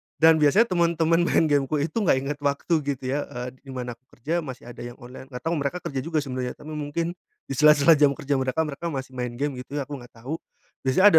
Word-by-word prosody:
Dan 160 0 +6
biasanya 155 +10 +5
temen-temen 170 -1 +3
main - - +4
game-ku 145 -1 +2
itu 155 +7 -2
gak - - +5
inget 140 +2 -2
waktu 145 +4 0
gitu 140 -2 -2
ya. 145 +2 0
Eee, 125 0 -5
di 140 - -24
mana 125 -2 -5
aku 130 - -50
kerja 155 +8 -1
masih 130 -6 -7
ada 120 - -11
yang 120 0 -8
online, 125 +2 -10
gak 125 -2 -8
tau 165 - 0
mereka 140 +4 -1
kerja 135 -2 -3
juga 155 +1 -1
sebenarnya, 130 -2 -3
tapi 155 - -10
mungkin 155 +3 -2 0.4
di - - -1
sela-sela 150 +2 +7
jam 140 -2 +5
kerja 140 0 -1
mereka, 130 +5 +1
mereka 150 +2 -4
masih 135 -4 -4
main 125 -2 -4
gim 145 +4 -1
gitu 130 +3 -8
ya 145 - 0
aku 140 0 -6
nggak 120 - -14
tahu. 155 +6 -3 0.4
Biasanya 135 +10 +3
145 Hz, 230 wpm, -25 LUFS, 130-160 Hz, 0.4 s, sela-sela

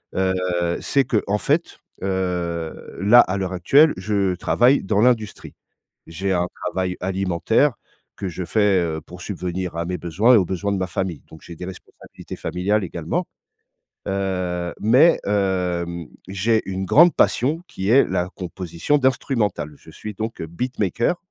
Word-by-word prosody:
Heu, 95 0 +1 0.5
c'est 135 -3 +2
qu'en 105 -3 0
fait, 155 +9 -1 0.2
heu, 90 -4 -3
là, 110 +5 +7
à 95 +2 -1
l'heure 95 -1 -3
actuelle, 140 - +5
je 95 -1 0
travaille 125 +9 +3
dans 105 +1 +1
l'industrie. 115 -4 0 0.5
J'ai 95 +4 -2
un 90 -1 +1 0.2
travail 95 -1 -2
alimentaire 95 +8 +1 0.4
que 95 - -4
je 90 +1 -5
fais, 100 0 +2
heu, 80 -2 -2
pour 90 0 -13
subvenir 90 -2 -4
à 85 - -1
mes 90 +1 -3
besoins 100 +9 +3
et - - +8
aux 95 - +2
besoins 100 +3 -2
de 100 - -1
ma 95 - -1
famille, 90 -2 -3
donc 80 - -14
j'ai 85 - -10
des 90 - -7
responsabilités 95 -1 -11
familiales 100 +3 -1
également, 85 - -3 0.8
heu. 90 -3 -2
Mais, 130 +10 +5
hem, 90 -4 -1 0.2
j'ai 110 +4 +1
une 95 0 -3
grande 170 - +6
passion 145 +7 +2
qui 95 +2 -3
est 135 +4 +6
la 90 0 -1
composition 90 - -2
d'instrumentales. 120 - 0
Je - - -16
suis 105 -1 -8
donc 110 +3 -5
beatmaker 110 - -1
95 Hz, 150 wpm, -22 LUFS, 90-110 Hz, 0.8 s, et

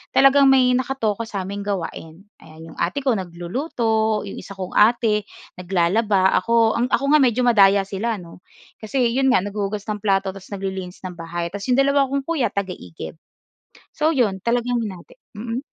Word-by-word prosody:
talagang 275 0 +6
may 260 -2 +5
nakatoka 240 -4 -1
sa'ming 200 -1 -5
gawain, 180 -3 -5 0.2
ayan. 160 +1 -13
'Yong - - -16
ate 180 +11 -1
ko 265 - +2
nagluluto. 220 - -1
'Yong 200 - -7
isa 200 - -10
kong 185 -1 -6
ate, 215 -1 +3 0.3
naglalaba. 190 +2 +2
Ako, 230 -1 +3
ang 245 - +1
ako 260 - 0
nga 305 - +6
medyo 250 -2 +2
madaya 200 -4 +5
sila 205 +4 -3
'no, 175 -4 -12 0.4
kasi 235 +2 0
'yon 265 +2 +1
nga 250 -8 +3
naghuhugas 205 0 -3
ng 210 0 -4
plato 195 -1 +1
ta's 195 +1 -11
naglilinis 190 -2 -5
ng 180 -2 -8
bahay. 170 0 -4
Ta's 200 +2 -7
'yong 250 0 +2
dalawa 280 0 +3
akong 275 +1 -2
kuya 310 -6 0
taga-igib. 180 - -6 0.7
So 310 +1 +1
'yon 210 -7 +1
talagang 240 +3 0
hinati. 195 -6 -8 0.2
Mm? 230 +4 -4
210 Hz, 170 wpm, -21 LUFS, 190-245 Hz, 0.7 s, talagang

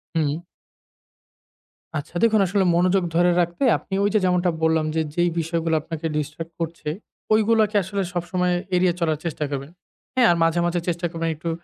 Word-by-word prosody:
হুম। 155 0 0 1.6
আচ্ছা, 150 +2 -7
দেখুন 220 -2 +4
আসলে 195 +1 +1
মনোযোগ 185 +2 +3
ধরে 175 +1 +4
রাখতে 175 +8 -2
আপনি 190 - -11
ওই 205 - +3
যে 215 - +4
যেমনটা 180 -1 +2
বললাম 160 -1 +3
যে 160 - +2
যেই 175 0 +2
বিষয়গুলো 165 0 0
আপনাকে 160 0 -6
ডিস্ট্রাক্ট 155 +3 -5
করছে 165 -2 -4 0.4
ঐগুলাকে 220 -1 +3
আসলে 200 +2 -3
সবসময় 180 +1 0 0.2
এড়িয়ে 180 -1 +3
চলার 160 -3 +1
চেষ্টা 155 -2 -2
করবেন, 140 +2 -5 0.4
হ্যাঁ? 250 -2 +5
আর - - +3
মাঝে, 165 +1 +2
মাঝে 175 0 0
চেষ্টা 175 0 -1
করবেন 165 -1 -2
একটু 165 +2 -5
170 Hz, 165 wpm, -23 LUFS, 160-185 Hz, 1.6 s, হ্যাঁ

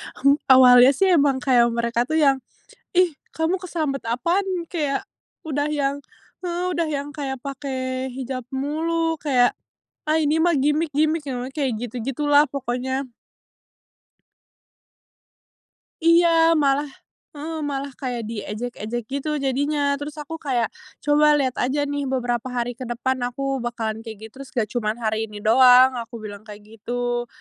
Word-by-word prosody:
Hmm, 280 +2 +3
awalnya 255 -1 +8
sih 380 +6 +3
emang 280 -6 +3
kayak 245 -3 +4
mereka 235 +1 0
tuh 315 - -1
yang, 275 -4 +4 0.5
"Ih, 355 -4 +3 0.2
kamu 320 +3 0
kesambet 320 -7 -3
apaan?" 335 +12 0 0.2
Kayak 295 -6 -2 0.3
udah 290 -2 -2
yang, 285 -1 -1 0.4
eee, 350 0 -2
udah 335 - +1
yang 290 -2 -3
kayak 270 -3 -4
pakai 260 -1 -4
hijab 255 -1 -5
mulu, 325 +4 -1
kayak, 250 -4 +3 0.5
ah, 310 - +3
ini 305 0 +2
mah 350 - +4
gimik-gimik, 305 +2 +1
nah 250 0 -4
kayak 275 -4 0
gitu-gitu 245 +4 -4
lah 290 +1 +6
pokoknya. 260 0 -3 3.0
Iya, 335 +1 +6 0.3
malah 285 0 +2 0.5
heeh, 315 +2 -5
malah 275 0 -4
kayak 245 -4 -3
diejek-ejek 230 +1 -5
gitu 280 +2 -3
jadinya, 280 +2 0 0.2
terus 290 0 -6
aku 300 +1 -6
kayak, 245 -6 -1 0.3
"Coba 295 0 +4
liat 260 -3 0
aja 275 +4 0
nih 285 -1 -2
beberapa 245 -2 -1
hari 245 -1 -2
ke - - -4
depan 255 +2 -1
aku 270 +2 -3
bakalan 230 -2 -3
kayak 225 -2 -8
gitu - - -24
terus 275 -1 -9
gak 225 -4 +1
cuman 215 -3 -1
hari 220 0 -1
ini 210 -1 -10
doang," 255 +3 +7
aku 235 0 -8
bilang 205 -1 -8
kayak 210 0 -11
gitu. 240 +3 -3
270 Hz, 140 wpm, -23 LUFS, 245-295 Hz, 3.0 s, awalnya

